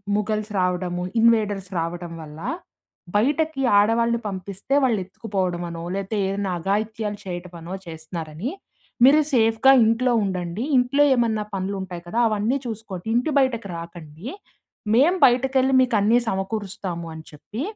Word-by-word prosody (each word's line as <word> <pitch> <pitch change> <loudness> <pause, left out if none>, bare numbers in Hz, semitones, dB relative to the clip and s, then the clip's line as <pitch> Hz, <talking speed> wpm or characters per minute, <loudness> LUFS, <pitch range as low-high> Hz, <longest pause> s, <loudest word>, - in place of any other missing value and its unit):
Mughals 215 0 -1
రావడము, 180 -1 -1 0.2
invaders 210 -4 +2
రావడం 170 0 -4
వల్ల, 155 0 -10 0.8
బయటకి 290 +4 +1 0.2
ఆడవాళ్ళని 230 +2 +2
పంపిస్తే 195 +6 -5
వాళ్ళు 235 -6 +2
ఎత్తుకుపోవడం 185 -3 -3
అనో 165 0 -6
లేతే 195 +2 -3
ఏదైనా 195 -1 -2
అఘాయిత్యాలు 210 +3 -2
చేయటమనో 175 -1 -7
చేస్తున్నారని 160 - -6 0.5
మీరు 295 +4 +7
సేఫ్‌గా 225 +2 +5
ఇంట్లో 235 +3 +2
ఉండండి. 185 +2 -3
ఇంట్లో 265 +4 +3
ఏమన్నా 220 -3 +1
పనులుంటాయి 190 -2 -4
కదా! 225 - -1
అవన్నీ 215 +6 0
చూసుకోండి. 220 -4 -6
ఇంటి 250 +6 +1
బయటకు 235 -6 0
రాకండీ. 165 +2 -9 0.7
మేము 335 +9 +4
బయటకెళ్లి 265 +1 +3
మీకు 250 -3 +1
అన్నీ 220 +4 +4
సమకూరుస్తామని 190 -5 -4
చెప్పి 205 - -8
205 Hz, 120 wpm, -23 LUFS, 180-235 Hz, 0.8 s, మీరు